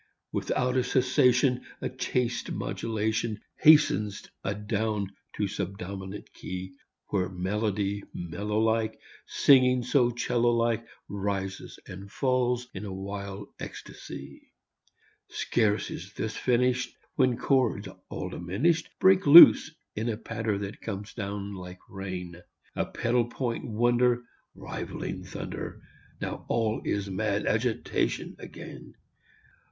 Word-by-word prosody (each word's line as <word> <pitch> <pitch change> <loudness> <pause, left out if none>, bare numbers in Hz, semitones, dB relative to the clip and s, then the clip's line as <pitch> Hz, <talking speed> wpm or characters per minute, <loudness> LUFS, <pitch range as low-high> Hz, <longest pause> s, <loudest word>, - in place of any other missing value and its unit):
Without 125 0 0
a 130 - +3
cessation 125 0 +3 0.2
A - - -2
chaste 125 -1 -1
modulation 110 0 -2 0.2
Hastens 145 -10 +5 0.2
adown 105 0 -1 0.2
to 105 - -1
subdominant 95 +1 -6
key, 95 0 -6 0.4
Where 90 -2 0
melody 100 +2 -1
mellow 100 +5 -3
like 110 0 +1 0.3
Singing 125 -2 +5
so 125 0 +3
'cello 120 0 +1
like 115 -1 +1 0.2
Rises 100 -1 -3
and 100 +2 -9
falls 125 -2 +1
in 95 - -6
a 100 - -5
wild 100 +1 -6
ecstasy. 70 - -9 0.8
Scarce 110 -3 0
is 95 +4 -7
this 110 -1 -3
finished 125 0 +1 0.2
When 130 -8 +2
chords 125 -7 +1 0.2
all - - -4
diminished 125 - 0
Break 190 -3 +5
loose 165 +4 +11 0.3
in 110 +3 -1
a 110 - -2
patter 110 -2 -2
that 100 +1 -6
comes 105 -1 -5
down 100 -1 -4
like 90 -1 -8
rain, 90 -3 -6 0.3
A - - 0
pedal 120 0 +1
point 120 0 -3
wonder 120 +2 +2 0.3
Rivaling - - -5
thunder. - - -6 0.4
Now - - -4
all 110 -1 0
is 100 -1 -1
mad 100 +1 -1
agitation 115 +1 0
again. - - -10
110 Hz, 115 wpm, -28 LUFS, 100-125 Hz, 0.8 s, loose